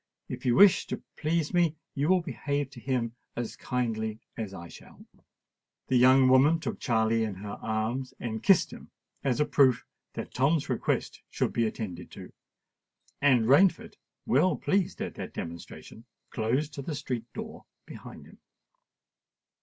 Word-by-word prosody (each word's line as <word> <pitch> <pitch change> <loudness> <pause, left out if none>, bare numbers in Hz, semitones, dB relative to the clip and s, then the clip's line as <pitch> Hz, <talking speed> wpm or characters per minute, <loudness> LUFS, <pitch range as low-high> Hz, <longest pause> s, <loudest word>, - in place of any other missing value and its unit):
"If - - -5
you 120 - +4
wish 195 -4 +6
to - - -5
please 160 +1 -1
me, 170 -3 +3 0.2
you 145 +4 0
will 185 -1 +4
behave 140 -2 -3
to 130 - -11
him 120 -2 -2 0.2
as 120 -2 -4
kindly 110 -4 -2 0.2
as 110 -4 -5
I 85 -3 -9
shall." - - -15 0.8
The 130 - +2
young 130 +1 +6
woman 135 +6 +5
took 165 - -4
Charley 115 -1 +1
in 105 -3 -3
her 100 +2 -7
arms, 110 +4 -2
and 110 -2 -4
kissed 195 -4 +4
him - - -12 0.3
as 135 -2 0
a 150 - +3
proof 130 -5 +3 0.3
that - - -6
Tom's 140 +3 +1
request - - -1
should - - -1
be 115 -1 +2
attended 90 -5 -6
to; - - -10 0.9
and 130 -5 +4
Rainford, 160 +10 +4 0.3
well 160 +8 +3
pleased 190 -2 0
at - - -5
that - - -8
demonstration, 85 +6 -8 0.3
closed 130 +7 -1
the 155 +2 -4
street 125 -4 -5
door 220 0 -8 0.2
behind - - -11
him. - - -17
130 Hz, 155 wpm, -28 LUFS, 110-150 Hz, 0.9 s, wish